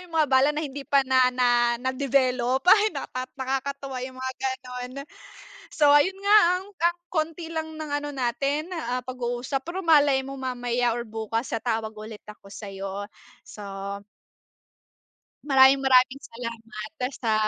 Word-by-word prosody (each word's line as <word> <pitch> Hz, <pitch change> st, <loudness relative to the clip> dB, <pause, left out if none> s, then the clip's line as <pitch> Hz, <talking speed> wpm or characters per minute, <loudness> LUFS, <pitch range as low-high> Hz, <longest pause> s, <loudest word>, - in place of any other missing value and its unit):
yung 355 Hz, -2 st, -13 dB
mga 310 Hz, -3 st, +3 dB
bala 265 Hz, +2 st, +5 dB
na 305 Hz, -, -1 dB
hindi 275 Hz, -1 st, -7 dB
pa 275 Hz, -1 st, +4 dB
na 260 Hz, -1 st, +4 dB
na 240 Hz, -1 st, +2 dB
na-develop 260 Hz, 0 st, 0 dB
ay! 420 Hz, +3 st, +6 dB
nakat 255 Hz, 0 st, -5 dB
nakakatuwa 270 Hz, 0 st, -3 dB
yung 255 Hz, +1 st, -7 dB
mga 260 Hz, 0 st, -4 dB
gano'n. 255 Hz, -1 st, -4 dB, 0.8 s
So, 295 Hz, -2 st, +3 dB
ayun 370 Hz, +7 st, +4 dB
nga 405 Hz, +1 st, +5 dB, 0.2 s
ang, -, -, -11 dB
ang 345 Hz, -3 st, 0 dB
konti 325 Hz, 0 st, -2 dB
lang 315 Hz, -1 st, -5 dB
ng 305 Hz, -2 st, -5 dB
ano 290 Hz, 0 st, -4 dB
natin, 275 Hz, +5 st, -1 dB
ah, 255 Hz, -5 st, -2 dB
pag-uusap 250 Hz, +2 st, -4 dB
pero 350 Hz, +3 st, -4 dB
malay 290 Hz, -6 st, +4 dB
mo 275 Hz, +1 st, -7 dB
mamaya 245 Hz, -2 st, -1 dB
or 235 Hz, 0 st, -4 dB
bukas 225 Hz, +2 st, -3 dB
sa -, -, -2 dB
tawag 225 Hz, -2 st, -1 dB
ulit 215 Hz, 0 st, -9 dB
ako 210 Hz, -1 st, -13 dB
sayo. 195 Hz, 0 st, -6 dB, 0.3 s
So 210 Hz, -, -11 dB, 1.8 s
Maraming 270 Hz, -1 st, +6 dB
maraming 260 Hz, 0 st, +4 dB
salamat 230 Hz, -1 st, -8 dB, 0.2 s
sa 225 Hz, -3 st, -1 dB
260 Hz, 150 wpm, -25 LUFS, 240-290 Hz, 1.8 s, ay